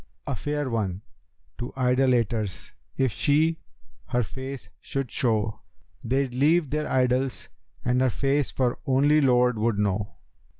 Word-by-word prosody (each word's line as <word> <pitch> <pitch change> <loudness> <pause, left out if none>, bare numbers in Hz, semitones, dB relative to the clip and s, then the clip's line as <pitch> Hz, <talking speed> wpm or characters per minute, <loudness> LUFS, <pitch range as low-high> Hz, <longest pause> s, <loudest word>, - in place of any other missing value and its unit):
[FN#287], - - -3
'A - - -1
fair 145 -2 -2
one, 100 -5 -2 0.6
to 120 - -5
idolaters 125 -5 +1 0.3
if 130 -3 +2
she 155 +7 +2 0.5
her 125 0 +1
face 130 +3 -7
should 135 -4 -4
show, 110 -3 0 0.4
They'd 130 +1 0
leave 150 +3 +2
their 150 0 -1
idols 130 0 0 0.4
and 125 +1 +2
her 130 - +4
face 140 +3 0
for 125 -2 -1
only 145 +3 +4
Lord 125 -3 +3
would 110 -1 +1
know. 105 0 -1
130 Hz, 135 wpm, -26 LUFS, 115-135 Hz, 0.6 s, her